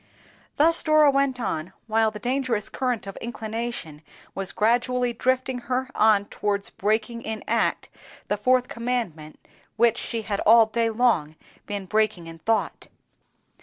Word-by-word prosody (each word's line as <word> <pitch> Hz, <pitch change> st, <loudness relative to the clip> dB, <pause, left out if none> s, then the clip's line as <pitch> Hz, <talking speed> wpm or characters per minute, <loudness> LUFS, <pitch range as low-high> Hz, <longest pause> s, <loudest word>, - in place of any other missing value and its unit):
Thus 330 Hz, +3 st, +3 dB
Dora 310 Hz, -2 st, +5 dB
went 275 Hz, -2 st, +1 dB
on, 160 Hz, -7 st, -3 dB
while 225 Hz, 0 st, +2 dB
the 215 Hz, -, -8 dB
dangerous 245 Hz, -2 st, -1 dB
current 250 Hz, -5 st, -2 dB
of 195 Hz, -, -8 dB
inclination 225 Hz, -8 st, -5 dB, 0.3 s
was 195 Hz, -1 st, -3 dB
gradually 245 Hz, +2 st, +1 dB
drifting 255 Hz, +1 st, 0 dB
her 260 Hz, +1 st, -1 dB
on 210 Hz, -2 st, +4 dB
towards 200 Hz, -1 st, -2 dB
breaking 220 Hz, +3 st, -1 dB
in 220 Hz, -1 st, -5 dB
act -, -, 0 dB, 0.4 s
the 205 Hz, -, 0 dB
Fourth 250 Hz, +4 st, +2 dB
Commandment, 230 Hz, -12 st, -4 dB, 0.4 s
which 235 Hz, 0 st, +3 dB
she 230 Hz, -2 st, -3 dB
had 205 Hz, -2 st, -2 dB
all 225 Hz, +1 st, +6 dB
day 230 Hz, +1 st, 0 dB
long 220 Hz, -10 st, +1 dB, 0.3 s
been 205 Hz, -2 st, -4 dB
breaking 215 Hz, -3 st, 0 dB
in 165 Hz, 0 st, -10 dB
thought. 225 Hz, +6 st, -1 dB
225 Hz, 140 wpm, -24 LUFS, 205-250 Hz, 0.4 s, all